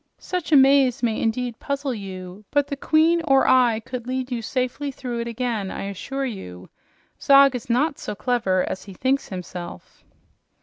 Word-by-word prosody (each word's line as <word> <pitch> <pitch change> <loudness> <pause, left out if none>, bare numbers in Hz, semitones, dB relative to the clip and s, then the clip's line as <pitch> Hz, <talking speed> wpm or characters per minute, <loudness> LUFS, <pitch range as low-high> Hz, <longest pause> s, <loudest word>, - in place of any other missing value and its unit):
"Such 360 -3 -4
a - - +6
maze 270 -3 +5
may 225 -2 0
indeed 230 +1 -2
puzzle 280 -1 -2
you, 190 -2 -8
but 290 -1 +2
the 285 0 -4
queen 320 +4 +3
or 270 0 +4
I 240 -3 +4
could 245 +1 -7
lead 255 0 -3
you 240 -2 -2
safely 255 +4 -2
through 250 -3 -5
it 235 - -3
again, 230 -4 -2
I - - -5
assure 235 +8 -4
you. 90 - -8 0.5
Zog 275 -1 +6
is 245 - -6
not 280 +5 +1
so - - -5
clever 210 -7 0
as - - -5
he 195 - -10
thinks 265 +6 0
himself." 180 - -8
250 Hz, 175 wpm, -23 LUFS, 215-275 Hz, 0.5 s, a